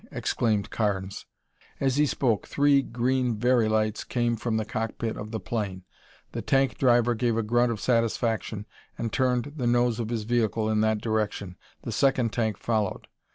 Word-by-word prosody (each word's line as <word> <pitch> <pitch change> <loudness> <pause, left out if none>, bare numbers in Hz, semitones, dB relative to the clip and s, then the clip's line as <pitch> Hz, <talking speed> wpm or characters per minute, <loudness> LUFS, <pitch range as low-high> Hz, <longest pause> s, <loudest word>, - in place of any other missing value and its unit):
exclaimed 105 -4 0
Carnes. 100 -3 -2 0.5
As 135 -1 +1
he 150 0 +4
spoke, 120 -6 0
three 140 -1 +4
green 125 -1 0
Very 120 -1 +3
lights 110 0 0
came 120 -1 0
from 115 0 -2
the 110 - -1
cockpit 115 +1 -3
of 105 - -6
the 110 0 -3
plane. 100 -6 -3 0.5
The - - -4
tank 135 0 +1
driver 120 -2 +4
gave 115 0 0
a 115 - +1
grunt 120 +2 +2
of 110 - -3
satisfaction 115 -3 0 0.3
and 115 -1 -3
turned 130 +1 +1
the 125 -4 -1
nose 120 -1 +2
of 115 -2 -2
his 115 -2 -2
vehicle 110 -1 0
in 110 0 +2
that 110 -1 +1
direction. 105 -4 -2 0.3
The - - -4
second 125 -4 +2
tank 110 -4 0
followed. 110 -4 -2
115 Hz, 170 wpm, -27 LUFS, 110-120 Hz, 0.5 s, he